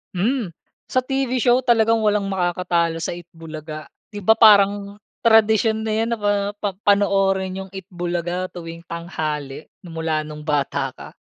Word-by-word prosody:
Hmm. 205 -1 -1 0.3
Sa 255 -1 0
TV 270 -1 -1
show 245 0 +4
talagang 230 -3 +3
walang 210 -2 +1
makakatalo 175 -2 0
sa - - -2
Eat 175 -1 -9
Bulaga. 155 -1 -8 0.2
'Di 205 -2 -9
ba, 220 +3 +5
parang 200 -2 +5 0.2
tradisyon 220 -1 +3
na 220 - -2
yan 225 +1 0
na - - -14
pa 205 0 +2 0.2
pa 205 0 -2 0.2
panoorin 195 -2 +2
yung - - -16
Eat 190 - -6
Bulaga 175 +1 -3
tuwing 165 0 -8
tanghali 155 -4 -5 0.2
nung 165 -2 -8
mula 155 -1 -1
nung 150 0 -9
bata 145 -2 -1
ka. - - -10
190 Hz, 160 wpm, -21 LUFS, 170-220 Hz, 0.3 s, ba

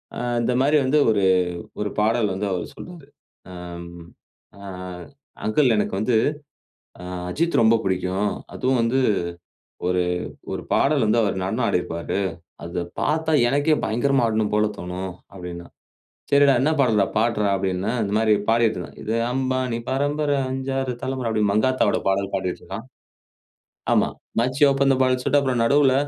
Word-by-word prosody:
ஆ - - -5 0.2
இந்த 120 +2 +1
மாரி 145 +3 +4
வந்து 145 +4 +3
ஒரு 100 -2 +1 0.6
ஒரு 105 0 -1
பாடல் 110 0 +2
வந்து 100 +2 -2
அவர் 90 -2 -3
சொல்றாரு. 170 -6 -11 0.5
அம். 85 -1 -8 0.7
அ - - -13 0.8
"அங்கிள் 125 +3 +3
எனக்கு 105 - -1
வந்து, 115 +3 +1 0.9
அ - - -8 0.3
அஜித் 170 - +1
ரொம்ப 115 +1 +5
பிடிக்கும். 95 +2 0 0.2
அதுவும் 130 -1 +1
வந்து 120 +3 +1 0.9
ஒரு 90 0 +2 0.5
ஒரு - - -4
பாடல் 140 -3 +3
வந்து 110 +2 +3
அவரு 100 -2 0
நடனம் 115 +5 0
ஆடியிருப்பாரு. 85 +2 -2 0.4
அத 85 +1 -4 0.2
பாத்தா 160 +1 0 0.2
எனக்கே 145 +4 +2
பயங்கரமா 125 +2 +2
ஆடணும் 110 -1 0
போல 105 0 +3
தோணும்" 90 +1 -5 0.2
அப்டின்னா. 90 -2 -8 0.7
"சரிடா, 140 -1 +6
என்ன 150 +4 +2
பாடல்றா 110 -6 +3
பாடுறா" 110 -2 +1
அப்படினேன். 95 +5 -1
இந்த 100 0 -2
மாரி 110 -1 +3 0.2
பாடிட்ருந்தான். 110 -6 0
"இது 110 - -1 0.2
அம்பானி 130 -2 -1
பரம்பர 145 +2 0 0.2
அஞ்சு 135 0 -3
ஆறு 130 -2 -2
தலைமுற" 130 -2 -2
அப்படின்னு, 105 -2 +1
மங்காத்தாவோட 110 0 +2
பாடல் 100 0 -1
பாடிட்ருந்தான். 95 -2 -4 1.1
ஆமா, - - +3 0.3
"மச்சி 130 +4 +1
ஓப்பன் 135 0 +3
த - - +2
பாட்டில்னு" 130 -1 +2
சொல்ட்டு 145 +1 +3
அப்றம் 125 -4 +1
நடுவுல, 140 +1 +4
115 Hz, 145 wpm, -23 LUFS, 100-135 Hz, 1.1 s, சரிடா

